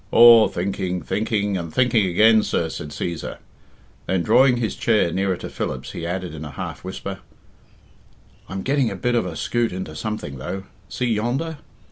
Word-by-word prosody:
"Aw, 115 Hz, -1 st, +8 dB
thinking, 90 Hz, 0 st, -3 dB
thinking, 105 Hz, -2 st, -1 dB
and 85 Hz, -2 st, -5 dB
thinking 115 Hz, -4 st, +3 dB
again, 110 Hz, +5 st, +5 dB
sir," 85 Hz, -5 st, -1 dB
said 75 Hz, -1 st, -6 dB
Cæsar. 85 Hz, +2 st, -4 dB, 0.7 s
Then, 95 Hz, -2 st, +1 dB
drawing 125 Hz, +8 st, +5 dB
his 115 Hz, -3 st, -2 dB
chair 110 Hz, -7 st, +2 dB
nearer 95 Hz, 0 st, 0 dB
to -, -, -7 dB
Philip's, 65 Hz, -1 st, -4 dB
he 85 Hz, -, -5 dB
added, 90 Hz, -1 st, -3 dB
in 80 Hz, 0 st, -7 dB
a 75 Hz, -, -6 dB
half 70 Hz, -, -6 dB
whisper, 95 Hz, +1 st, -6 dB, 1.3 s
"I'm 95 Hz, 0 st, -4 dB
getting 135 Hz, -3 st, +2 dB
a 100 Hz, -, -5 dB
bit 120 Hz, +6 st, -1 dB
of 115 Hz, -6 st, +1 dB
a 85 Hz, -, -6 dB
skute 120 Hz, +8 st, 0 dB
into 90 Hz, -4 st, -6 dB
something, 75 Hz, -8 st, -5 dB
though. 95 Hz, +8 st, -5 dB, 0.3 s
See 125 Hz, -, -2 dB
yonder? 125 Hz, +8 st, -1 dB
95 Hz, 170 wpm, -22 LUFS, 85-115 Hz, 1.3 s, Aw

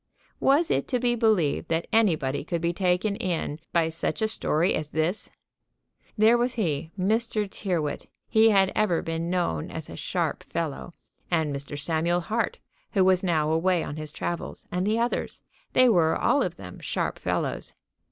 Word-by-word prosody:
Was 295 Hz, +5 st, +3 dB
it -, -, +1 dB
to 250 Hz, -, 0 dB
be 240 Hz, 0 st, +2 dB
believed 215 Hz, -10 st, +2 dB
that 165 Hz, +1 st, 0 dB
anybody 160 Hz, -13 st, +2 dB
could 170 Hz, +2 st, -2 dB
be 170 Hz, +1 st, 0 dB
taken 185 Hz, +3 st, +1 dB
in 165 Hz, -4 st, -2 dB
by 170 Hz, -1 st, +2 dB
such 165 Hz, +6 st, -2 dB
a -, -, +3 dB
story 180 Hz, -5 st, +1 dB
as 155 Hz, -1 st, -3 dB
this? 160 Hz, +7 st, -1 dB, 0.9 s
There 225 Hz, +3 st, +5 dB
was 245 Hz, +1 st, 0 dB
he, 160 Hz, -8 st, -1 dB
Mr. 215 Hz, +2 st, 0 dB
Tyrrwhit: 175 Hz, -7 st, -3 dB, 0.2 s
he 220 Hz, 0 st, +5 dB
had 195 Hz, -2 st, +4 dB
ever 200 Hz, -6 st, +1 dB
been 165 Hz, +1 st, -3 dB
known 175 Hz, -, -1 dB
as -, -, -7 dB
a -, -, -7 dB
sharp -, -, -2 dB
fellow; 165 Hz, -2 st, -3 dB, 0.4 s
and 160 Hz, -4 st, +1 dB
Mr. 140 Hz, +1 st, -6 dB
Samuel 165 Hz, +4 st, 0 dB
Hart, 230 Hz, -, -1 dB, 0.4 s
who 195 Hz, -4 st, +4 dB
was 185 Hz, -1 st, +4 dB
now 155 Hz, -4 st, +1 dB
away 170 Hz, +1 st, +2 dB
on 145 Hz, -, -6 dB
his 155 Hz, -1 st, -6 dB
travels, 170 Hz, +2 st, -5 dB
and 180 Hz, +2 st, -1 dB
the 215 Hz, +1 st, +2 dB
others; 235 Hz, +1 st, -1 dB, 0.3 s
they 255 Hz, -, +6 dB
were 170 Hz, -8 st, +4 dB
all 285 Hz, -, +2 dB
of 180 Hz, -7 st, -1 dB
them 90 Hz, -, -10 dB
sharp -, -, -2 dB
fellows. -, -, -2 dB
180 Hz, 170 wpm, -26 LUFS, 160-215 Hz, 0.9 s, they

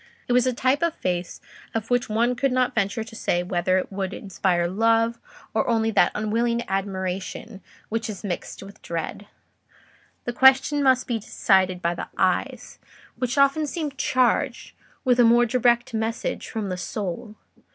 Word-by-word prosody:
It 245 Hz, -, +1 dB
was 250 Hz, +1 st, +4 dB
a -, -, +3 dB
type 260 Hz, +4 st, +1 dB
of 335 Hz, -1 st, +1 dB
face 180 Hz, -1 st, -3 dB, 0.4 s
of 225 Hz, +1 st, -3 dB
which 245 Hz, -1 st, +1 dB
one 235 Hz, +3 st, +2 dB
could 270 Hz, +2 st, 0 dB
not 255 Hz, 0 st, +1 dB
venture 220 Hz, +1 st, -1 dB
to 225 Hz, 0 st, -12 dB
say 175 Hz, -5 st, 0 dB
whether 180 Hz, 0 st, +1 dB
it 185 Hz, -, -3 dB
would 195 Hz, 0 st, -3 dB
inspire 180 Hz, -3 st, 0 dB
love 225 Hz, +4 st, +2 dB, 0.3 s
or 220 Hz, -, +1 dB
only 225 Hz, -1 st, +1 dB
that 190 Hz, -4 st, +4 dB
unwilling 235 Hz, +3 st, 0 dB
admiration 195 Hz, +2 st, -4 dB, 0.3 s
which 225 Hz, +1 st, -2 dB
is 210 Hz, -1 st, -7 dB
mixed 190 Hz, 0 st, -5 dB
with 200 Hz, +1 st, -13 dB
dread: 170 Hz, +4 st, -5 dB, 1.0 s
the 240 Hz, -, -2 dB
question 265 Hz, +3 st, +5 dB
must 260 Hz, -2 st, +3 dB
be 235 Hz, -2 st, -2 dB
decided 185 Hz, -3 st, +1 dB
by 170 Hz, +1 st, +1 dB
the -, -, -6 dB
eyes, -, -, -1 dB, 0.4 s
which 250 Hz, +1 st, -2 dB
often 275 Hz, +2 st, +3 dB
seem 305 Hz, -1 st, -3 dB
charged 255 Hz, -2 st, 0 dB, 0.3 s
with 250 Hz, -1 st, +3 dB
a -, -, +7 dB
more 235 Hz, +1 st, +5 dB
direct 240 Hz, +1 st, +2 dB
message 225 Hz, +1 st, -3 dB
from 215 Hz, -3 st, -3 dB
the 185 Hz, -, -3 dB
soul. 210 Hz, +3 st, -5 dB
225 Hz, 165 wpm, -24 LUFS, 195-245 Hz, 1.0 s, a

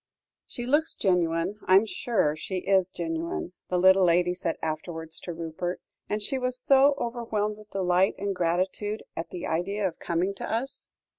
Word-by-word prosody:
"She 240 Hz, -, -5 dB
looks 295 Hz, +5 st, +2 dB
genuine; 180 Hz, +1 st, +1 dB
I 185 Hz, -, +5 dB
am 200 Hz, +3 st, +6 dB
sure 210 Hz, -8 st, 0 dB
she 185 Hz, +4 st, -4 dB
is 190 Hz, -2 st, +3 dB
genuine," 170 Hz, 0 st, -3 dB, 0.2 s
the 180 Hz, -, +1 dB
little 190 Hz, +1 st, +6 dB
lady 175 Hz, 0 st, +3 dB
said 175 Hz, -2 st, -3 dB
afterwards 160 Hz, 0 st, -4 dB
to 175 Hz, -, -6 dB
Rupert; 170 Hz, +2 st, -4 dB, 0.3 s
"and 210 Hz, 0 st, -1 dB
she 270 Hz, +5 st, 0 dB
was 250 Hz, 0 st, -1 dB
so 275 Hz, +1 st, +5 dB
overwhelmed 225 Hz, -4 st, -2 dB
with 215 Hz, 0 st, -15 dB
delight 185 Hz, 0 st, +2 dB
and 200 Hz, 0 st, -2 dB
gratitude 185 Hz, +5 st, -1 dB
at 165 Hz, -, -4 dB
the 175 Hz, -, -6 dB
idea 195 Hz, +5 st, 0 dB
of 175 Hz, -, -7 dB
coming 175 Hz, +3 st, 0 dB
to -, -, -5 dB
us." 245 Hz, +5 st, -3 dB
185 Hz, 170 wpm, -27 LUFS, 170-210 Hz, 0.3 s, am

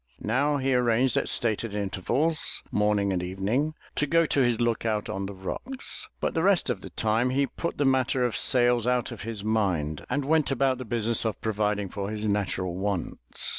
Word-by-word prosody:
Now 140 Hz, +7 st, +1 dB
he 135 Hz, -1 st, 0 dB
arranged 125 Hz, 0 st, +2 dB
at -, -, +1 dB
stated 110 Hz, -2 st, 0 dB
intervals, 120 Hz, -, -1 dB
morning 105 Hz, -1 st, +1 dB
and 90 Hz, -, -1 dB
evening, 100 Hz, +12 st, -1 dB, 0.2 s
to 150 Hz, -, +1 dB
go 165 Hz, +3 st, +3 dB
to 145 Hz, -, +1 dB
his 120 Hz, -3 st, +2 dB
look 120 Hz, -1 st, 0 dB
out 110 Hz, -2 st, -1 dB
on 95 Hz, 0 st, -3 dB
the 100 Hz, -, -7 dB
rocks, 245 Hz, -, -2 dB
but -, -, -1 dB
the 165 Hz, -, 0 dB
rest 185 Hz, -7 st, +3 dB
of 100 Hz, -6 st, -4 dB
the -, -, -9 dB
time 110 Hz, +3 st, +1 dB
he 140 Hz, +2 st, +2 dB
put 170 Hz, +5 st, -5 dB
the 145 Hz, -, +1 dB
matter 130 Hz, -1 st, +2 dB
of 120 Hz, -, -1 dB
sails 120 Hz, -2 st, +4 dB
out 125 Hz, 0 st, +1 dB
of 115 Hz, -, -8 dB
his 110 Hz, -2 st, -5 dB
mind, 90 Hz, -9 st, 0 dB
and 145 Hz, -1 st, -1 dB
went 155 Hz, 0 st, +2 dB
about 135 Hz, -1 st, +1 dB
his 130 Hz, -, -7 dB
business 115 Hz, 0 st, 0 dB
of 110 Hz, -2 st, -2 dB
providing 105 Hz, -2 st, -1 dB
for 100 Hz, +1 st, -5 dB
his 105 Hz, 0 st, -3 dB
natural 95 Hz, -3 st, -1 dB
wants. 95 Hz, -3 st, -2 dB
115 Hz, 200 wpm, -27 LUFS, 105-130 Hz, 0.2 s, sails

